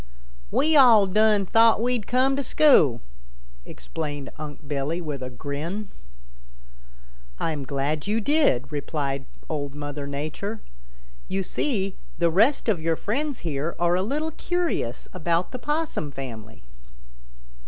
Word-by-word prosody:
"We 310 +1 +2
all 235 -7 +8
done 210 +1 +3
thought 225 +3 +5
we'd 240 -2 0
come 260 +2 +2
to 280 - -1
school," 160 - +4 0.7
explained 145 -4 -6
Unc' 150 -1 -8
Billy 145 +4 -2
with 150 -6 -5
a 130 - -4
grin. 150 - -5 1.5
"I'm 150 -4 -2
glad 145 +4 -2
you 215 +2 +1
did," 225 - +2
replied 140 -2 -3 0.2
Old 145 -2 -4
Mother 145 -1 -5
Nature. 155 +10 -4 0.7
"You 195 0 -1
see, 195 -3 -1 0.2
the 170 -1 +2
rest 225 - +3
of 200 -8 +1
your 165 0 +1
friends 275 - -2
here 155 +1 -2
are 175 0 +2
a 185 - +1
little 300 +10 -1
curious 340 - -2
about 170 0 0
the 255 - -5
Possum 295 - -2
family." 115 - -8
170 Hz, 130 wpm, -25 LUFS, 145-230 Hz, 1.5 s, all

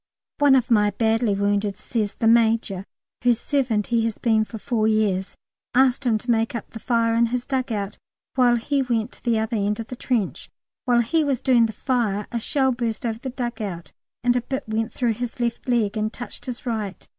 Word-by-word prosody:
One 285 -2 +6
of 245 -2 +1
my 210 -2 +5
badly 220 +1 +1
woundeds 200 0 0
says 215 -3 -2
"the 225 - 0
Major" 225 -4 +3 0.4
(whose 240 -2 +3
servant 240 -7 0
he 230 -1 +3
has 225 -2 -2
been 220 -2 +2
for 220 - -8
four 220 -1 0
years) 205 -3 +1 0.4
asked 260 +1 +3
him 225 -2 +3
to 240 +3 -2
make 225 +1 +1
up 235 - -6
the 225 - -8
fire 230 -1 +1
in 235 +1 +3
his 245 +1 -2
dug 260 -3 -1
out, 200 -2 -3 0.3
while 245 -2 +4
he 275 +4 0
went 235 -3 -1
to - - -15
the 235 -2 +2
other 220 +1 -1
end 210 +1 0
of 225 - -6
the 250 - -5
trench. 235 -5 -2 0.4
While 240 -2 +4
he 310 +8 +1
was 275 -4 0
doing 245 -4 +4
the - - -5
fire 220 -4 -1
a 235 - -1
shell 265 +3 +1
burst 235 -2 -2
over 225 -1 -2
the 260 - -5
dug 240 -2 -4
out 180 -5 -5 0.3
and 245 0 +3
a 245 - +2
bit 265 +1 -4
went 220 +1 -1
through 240 -3 0
his 245 +2 -5
left 240 +1 -2
leg 230 -4 +1
and 215 0 -1
touched 245 +2 -9
his 250 0 -6
right. 215 -5 -4
230 Hz, 215 wpm, -23 LUFS, 215-245 Hz, 0.4 s, One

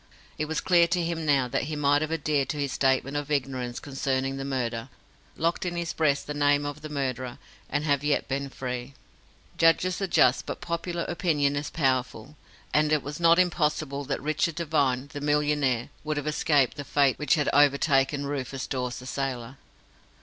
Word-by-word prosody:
It 155 - 0
was 160 +1 -2
clear 175 -2 +4
to 175 0 0
him 165 -1 -3
now 135 -3 +3
that 125 - -1
he 155 +1 -4
might 145 0 +3
have 155 0 -2
adhered 150 -4 0
to 150 - -2
his 140 -2 -1
statement 135 +1 +1
of 145 0 -3
ignorance 130 -4 -2
concerning 135 -1 -2
the 135 - -4
murder, 125 -3 -3 0.5
locked 165 +2 0
in 175 -1 -3
his 170 -1 -2
breast 145 -3 +1
the 150 - -4
name 145 0 +2
of 145 +1 -5
the 155 - -7
murderer, 130 -4 -3 0.3
and 150 - -1
have 145 -2 +1
yet 150 -1 +1
been 140 +1 -2
free. 125 0 -5 0.6
Judges 175 +4 +3
are 195 - 0
just, 130 -7 +3
but - - -4
popular 170 0 -3
opinion 150 -5 0
is 145 +1 -3
powerful, 130 -2 -1 0.4
and 150 0 +3
it 150 -2 +2
was 145 +2 -6
not 170 0 +5
impossible 150 -5 +1
that 135 - -2
Richard 155 +2 0
Devine, 145 -6 0
the 145 - -5
millionaire, 145 -4 +1
would 155 0 -2
have 145 - -3
escaped 150 -2 +2
the 145 - -4
fate 140 -1 +2
which 150 +1 +3
had 150 -3 0
overtaken 140 0 +3
Rufus 135 -2 -4
Dawes, 125 -2 -3
the 125 - -10
sailor. 130 -1 -4
145 Hz, 185 wpm, -27 LUFS, 135-155 Hz, 0.6 s, not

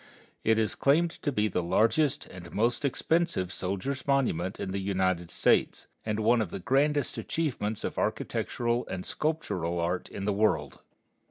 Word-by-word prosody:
It 110 0 +3
is 110 -2 +1
claimed 165 +5 +3
to 145 - 0
be 105 -4 +1
the 90 - -1
largest 130 - +2
and 90 -2 -11
most 120 +6 +1
expensive 155 - 0
soldiers' 100 +10 -3
monument 110 -10 +1
in 95 - -3
the 100 - -2
United 95 -3 0
States, - - +2 0.2
and 110 0 -1
one 115 +2 +4
of 105 - -2
the - - -5
grandest 140 +7 +1
achievements 115 -10 -2
of - - -3
architectural 120 0 -1
and 90 0 -5
sculptural 90 - -2
art 90 +2 -1
in 100 - -5
the 105 - +1
world. 105 +2 +1
110 Hz, 160 wpm, -29 LUFS, 95-140 Hz, 0.2 s, one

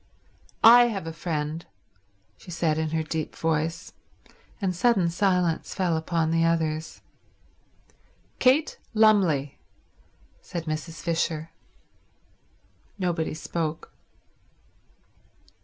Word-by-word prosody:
"I 240 +2 +9
have 205 -8 -3
a 165 - -5
friend," 160 -1 -3 0.7
she - - -16
said 160 -2 0
in 160 -1 -1
her 160 0 -1
deep 155 0 -4
voice; 165 +2 -2 0.7
and 190 -4 -1
sudden 190 -4 +2
silence 180 -3 0
fell 180 -4 +1
upon 160 0 0
the 165 0 +2
others. 160 -1 -1 1.4
"Kate 275 +5 +3 0.2
Lumley," 190 -11 +3 0.8
said 170 -2 -6
Mrs. 155 +1 -5
Fisher. 165 -1 -1 1.5
Nobody 170 -5 -1
spoke. 160 0 -4
165 Hz, 90 wpm, -26 LUFS, 160-180 Hz, 1.5 s, I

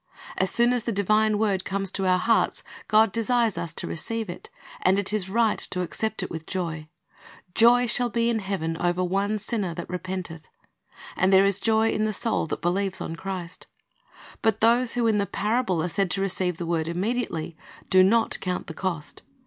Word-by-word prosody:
As 190 - +1
soon 240 +4 +3
as 245 - 0
the 235 - 0
divine 215 +1 +2
word 200 -3 0
comes 195 -1 -2
to 195 -1 -2
our 185 0 +4
hearts, 225 +5 +1 0.2
God 215 -1 +4
desires 230 -1 +1
us 170 - -4
to - - -5
receive 220 +4 -3
it; - - -11 0.3
and 185 +1 +3
it 200 +1 -1
is 195 -3 0
right 225 +2 +2
to 180 - -3
accept 220 +5 -2
it - - -6
with 160 -1 -7
joy. 165 -4 -4 0.7
"Joy 240 +2 +5
shall 240 +1 +1
be 235 0 0
in 235 -1 +1
heaven 190 -5 -3
over 175 +1 0
one 200 +4 0
sinner 205 -5 -2
that 170 - -6
repenteth." 180 -3 -5
^ - - -30 0.7
And 190 +1 +2
there 190 0 +6
is 200 0 +2
joy 220 +1 +2
in 215 - 0
the 215 - -1
soul 220 -4 0
that 155 - -5
believes 190 +2 0
on 165 - -5
Christ. 180 -1 -7 0.7
But 220 -1 +1
those 235 +2 +3
who 240 -1 +1
in 220 -2 +3
the 200 - 0
parable 210 -7 0
are - - 0
said 195 +1 0
to 195 - -1
receive 185 -3 -1
the 175 - -4
word 165 -1 -1
immediately, 180 -2 -2 0.4
do 185 -1 +7
not 225 +4 +3
count 180 -1 -3
the 160 - -7
cost. 170 -3 -4
195 Hz, 200 wpm, -25 LUFS, 180-220 Hz, 0.7 s, do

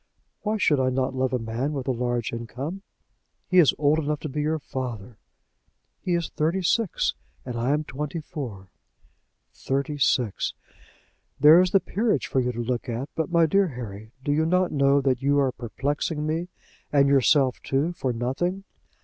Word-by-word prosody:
"Why 215 +1 -1
should 150 -8 +3
I 130 0 +2
not 130 0 -1
love 130 0 0
a 130 - +1
man 120 +5 -3
with 135 -2 -4
a - - +2
large 120 -2 -2
income?" 130 - -5 0.7
"He 185 - +4
is 160 - +7
old 150 +2 +3
enough 150 -1 -1
to 155 - -4
be 150 +2 -2
your 155 +2 0
father." 125 -6 -6 0.8
"He 180 - -1
is 170 -2 -1
thirty 165 +5 -1
six, 215 +2 +1 0.3
and 125 -2 -5
I 120 +2 -1
am 150 +2 +1
twenty 150 +3 -4
four." 115 - -7 0.8
"Thirty 140 +2 -2
six!" 120 -5 +1 0.8
"There 155 +5 +8
is 185 - +2
the 195 - +4
Peerage 210 - 0
for 135 - 0
you 125 -1 0
to 120 0 -4
look 125 +1 -2
at. 120 +4 -3
But, 160 - -2
my 170 -1 +5
dear 195 +5 +3
Harry, 110 - -8
do 145 - 0
you 155 +2 +2
not 180 +1 +2
know 140 0 +3
that 130 -2 +1
you 140 +1 +2
are 135 -2 +3
perplexing 145 +6 -3
me 160 +3 -1 0.4
and 140 -1 +4
yourself 135 -1 +3
too, 145 +6 0
for 135 -7 -2
nothing? 135 +11 -2
140 Hz, 180 wpm, -25 LUFS, 125-160 Hz, 0.8 s, There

